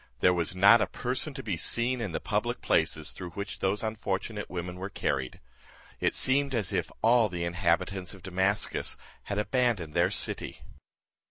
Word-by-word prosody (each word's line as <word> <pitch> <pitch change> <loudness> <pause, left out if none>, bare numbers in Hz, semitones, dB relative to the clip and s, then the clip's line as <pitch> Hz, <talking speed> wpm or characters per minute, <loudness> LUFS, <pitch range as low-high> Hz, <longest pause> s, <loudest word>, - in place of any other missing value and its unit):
There 90 - +5
was 85 0 0
not 100 +5 +7
a - - +2
person 130 +4 -2
to 135 - -6
be 105 -6 -2
seen 120 +8 +1
in 105 -6 -3
the 80 - -2
public 115 +5 -2
places 80 -1 +1
through 90 -2 -7
which 100 +1 -5
those 95 +3 0
unfortunate 105 -1 -3
women 90 0 -5
were 95 +2 -5
carried. 65 -9 -2 0.6
It - - +1
seemed 140 0 +2
as 105 -5 -1
if - - -1
all 115 -1 +5
the 90 -2 -4
inhabitants 90 +2 -1
of 95 - -16
Damascus 95 +2 0 0.3
had 100 - -3
abandoned 105 - 0
their 85 +1 +3
city. 100 - 0
100 Hz, 170 wpm, -29 LUFS, 90-115 Hz, 0.6 s, not